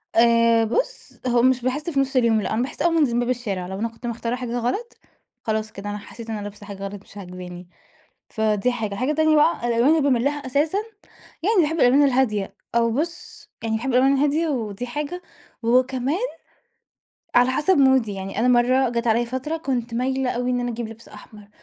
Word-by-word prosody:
آآ 230 Hz, 0 st, +5 dB
بُصّ -, -, -3 dB
هو 240 Hz, -1 st, +3 dB
مش 255 Hz, 0 st, +3 dB
باحس 270 Hz, +6 st, -2 dB
في 280 Hz, -4 st, 0 dB
نص 270 Hz, 0 st, 0 dB
اليوم 230 Hz, -3 st, +3 dB
لأ، 195 Hz, -, -2 dB
أنا 220 Hz, -, +1 dB
باحس 260 Hz, -, -4 dB
أول 340 Hz, -1 st, +3 dB
ما 330 Hz, -, +3 dB
أنزل 275 Hz, -6 st, +2 dB
من 240 Hz, -, +2 dB
باب 245 Hz, 0 st, -1 dB
الشارع. 205 Hz, -8 st, -2 dB
لو 190 Hz, +1 st, -6 dB
أنا 230 Hz, -, 0 dB
كنت 230 Hz, +2 st, -13 dB
مختارة 235 Hz, 0 st, -2 dB
حاجة 245 Hz, -1 st, -4 dB
غلط 400 Hz, -, -3 dB, 0.5 s
خلاص 220 Hz, -1 st, -2 dB
كده 205 Hz, 0 st, -7 dB
أنا 205 Hz, -, -3 dB
حسيت 230 Hz, +2 st, -10 dB
إن 220 Hz, -, -2 dB
أنا 205 Hz, -, -5 dB
لابسه 205 Hz, 0 st, -9 dB
حاجة 200 Hz, -1 st, -8 dB
غلط 200 Hz, 0 st, -6 dB
مش 205 Hz, -, -16 dB
عاجباني 180 Hz, -2 st, -9 dB, 0.6 s
فدي 220 Hz, +2 st, 0 dB
حاجة، 220 Hz, -4 st, -3 dB
حاجة 255 Hz, +8 st, 0 dB
تانية 315 Hz, 0 st, +3 dB
بقى 300 Hz, -4 st, +3 dB
الألوان 235 Hz, +3 st, +3 dB
اللي 320 Hz, 0 st, +4 dB
باميل 260 Hz, -4 st, +2 dB
لها 290 Hz, -1 st, -1 dB
أساسًا 295 Hz, +8 st, +1 dB, 0.7 s
يعني 415 Hz, -1 st, +4 dB
باحب 320 Hz, +1 st, 0 dB
الألوان 270 Hz, +3 st, +5 dB
الهادية، 245 Hz, -7 st, +1 dB, 0.2 s
أو 230 Hz, 0 st, +3 dB
بُصّ 335 Hz, +8 st, -5 dB
يعني 225 Hz, -1 st, 0 dB
باحب 240 Hz, +4 st, -3 dB
الألوان 260 Hz, +2 st, +4 dB
الهادية 295 Hz, +4 st, +2 dB
ودي 240 Hz, -4 st, -3 dB
حاجة، 295 Hz, +8 st, -4 dB, 0.4 s
وكمان 255 Hz, +5 st, +2 dB, 1.2 s
على 245 Hz, +1 st, +5 dB
حسب 305 Hz, +7 st, +2 dB
مودي. 265 Hz, -6 st, +4 dB
يعني 195 Hz, 0 st, -5 dB
أنا 240 Hz, -, +2 dB
مرّة 250 Hz, +1 st, +4 dB
جات 235 Hz, 0 st, -2 dB
عليَّ 230 Hz, +1 st, +3 dB
فترة 260 Hz, +6 st, -3 dB
كنت 245 Hz, -6 st, -3 dB
مايلة 260 Hz, +1 st, 0 dB
أوي 245 Hz, +1 st, -2 dB
إن 245 Hz, -, 0 dB
أنا 245 Hz, 0 st, -2 dB
أجيب 235 Hz, -1 st, -4 dB
لبس 225 Hz, +1 st, -12 dB
أحمر، 210 Hz, -2 st, -14 dB
245 Hz, 205 wpm, -23 LUFS, 225-275 Hz, 1.2 s, آآ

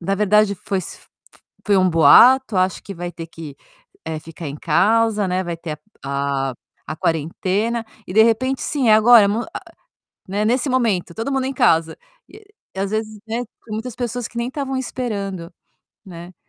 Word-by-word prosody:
na 195 Hz, +3 st, -1 dB
verdade 210 Hz, 0 st, +3 dB
foi 195 Hz, +1 st, -3 dB
f -, -, -8 dB, 0.6 s
foi 205 Hz, -2 st, +3 dB
um 185 Hz, -1 st, +3 dB
boato, 205 Hz, -, +6 dB
acho 185 Hz, 0 st, 0 dB
que 200 Hz, -, -8 dB
vai 175 Hz, -1 st, -6 dB
ter 165 Hz, -, -8 dB
que, 155 Hz, -4 st, -10 dB, 0.5 s
eh, 160 Hz, -1 st, -4 dB
ficar 160 Hz, 0 st, -9 dB
em 140 Hz, -, -7 dB
casa, 210 Hz, +5 st, +2 dB
né, 185 Hz, +1 st, -1 dB
vai 170 Hz, -1 st, -4 dB
ter 160 Hz, -2 st, -7 dB, 0.3 s
a 140 Hz, -1 st, -1 dB
a -, -, -14 dB, 0.3 s
a -, -, -5 dB
quarentena, 190 Hz, +10 st, -1 dB, 0.2 s
e -, -, -7 dB
de 220 Hz, +3 st, +6 dB
repente 255 Hz, +4 st, +1 dB
sim 275 Hz, -6 st, 0 dB
agora, 220 Hz, +1 st, +7 dB
m 205 Hz, +2 st, 0 dB, 0.2 s
a -, -, -4 dB, 0.7 s
né, 205 Hz, +3 st, -1 dB
nesse 245 Hz, +5 st, +1 dB
momento 225 Hz, -10 st, 0 dB
todo 225 Hz, +7 st, -4 dB
mundo 265 Hz, -1 st, 0 dB
em 270 Hz, -, -2 dB
casa, 165 Hz, -8 st, +2 dB, 0.3 s
e 430 Hz, -, -15 dB, 0.3 s
às 195 Hz, 0 st, -2 dB
vezes, 215 Hz, 0 st, -3 dB
né, 225 Hz, -, -2 dB
tem -, -, -19 dB, 0.3 s
muitas 225 Hz, +2 st, -5 dB
pessoas 245 Hz, -1 st, -4 dB
que 235 Hz, -, -15 dB
nem 235 Hz, +1 st, -2 dB
estavam 270 Hz, 0 st, -4 dB
esperando, 200 Hz, -9 st, -4 dB, 0.5 s
né. 175 Hz, -1 st, -11 dB
200 Hz, 180 wpm, -20 LUFS, 170-235 Hz, 0.7 s, agora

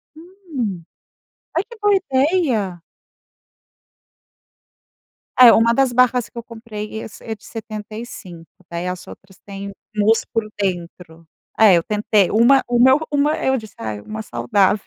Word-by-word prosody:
Hum. 315 Hz, -, -6 dB, 0.7 s
Ai, 340 Hz, -, +1 dB
que 470 Hz, +2 st, -13 dB
boa 415 Hz, -1 st, +3 dB
ideia. 265 Hz, -, 0 dB, 2.6 s
É 245 Hz, -2 st, +10 dB
uma 230 Hz, +1 st, +4 dB
das 270 Hz, 0 st, +2 dB
barras 250 Hz, -1 st, +2 dB
que -, -, -17 dB
eu 235 Hz, -, -5 dB
comprei, 220 Hz, -2 st, -7 dB
esse 210 Hz, -, -11 dB
é 220 Hz, -1 st, -5 dB
de -, -, -26 dB
75, 215 Hz, -6 st, -9 dB, 0.2 s
daí 170 Hz, +1 st, -4 dB
as 180 Hz, 0 st, -5 dB
outras 190 Hz, -1 st, -14 dB
têm 200 Hz, 0 st, -7 dB, 0.2 s
mousse 215 Hz, +2 st, +2 dB
por 225 Hz, -2 st, -1 dB, 0.2 s
dentro. 170 Hz, -3 st, -5 dB, 0.3 s
É, 210 Hz, -4 st, +7 dB
eu 170 Hz, -, +2 dB
tentei 210 Hz, -2 st, +1 dB
uma 240 Hz, +5 st, +5 dB
uma 260 Hz, +4 st, +5 dB
uma, 290 Hz, +2 st, +2 dB
eu 265 Hz, 0 st, +1 dB
disse: 220 Hz, -3 st, -10 dB
"Ah, 110 Hz, -2 st, -5 dB
uma 110 Hz, +1 st, -6 dB
saudável". 185 Hz, -, +1 dB
220 Hz, 135 wpm, -20 LUFS, 190-255 Hz, 2.6 s, É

